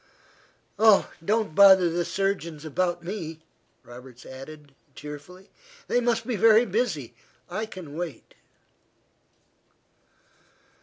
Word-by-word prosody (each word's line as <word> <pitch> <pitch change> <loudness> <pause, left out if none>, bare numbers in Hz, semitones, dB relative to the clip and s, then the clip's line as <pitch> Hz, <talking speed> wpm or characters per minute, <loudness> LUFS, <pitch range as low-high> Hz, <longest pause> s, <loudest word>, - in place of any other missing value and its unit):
"Oh, 215 -2 +5
don't 215 -1 0
bother 190 -1 +7
the 170 +1 -1
surgeons 170 -6 -3
about 175 +2 -1
me," 165 -4 -6 0.4
Roberts 125 0 -13
added, 140 +2 -11 0.2
cheerfully. 180 +7 -11 0.4
"They 245 - +1
must 235 -1 0
be 250 - -2
very 225 +3 +5
busy. 190 - -2 0.4
I 215 +4 -3
can 175 -8 -10
wait." 165 -7 -7
175 Hz, 100 wpm, -25 LUFS, 155-210 Hz, 0.4 s, bother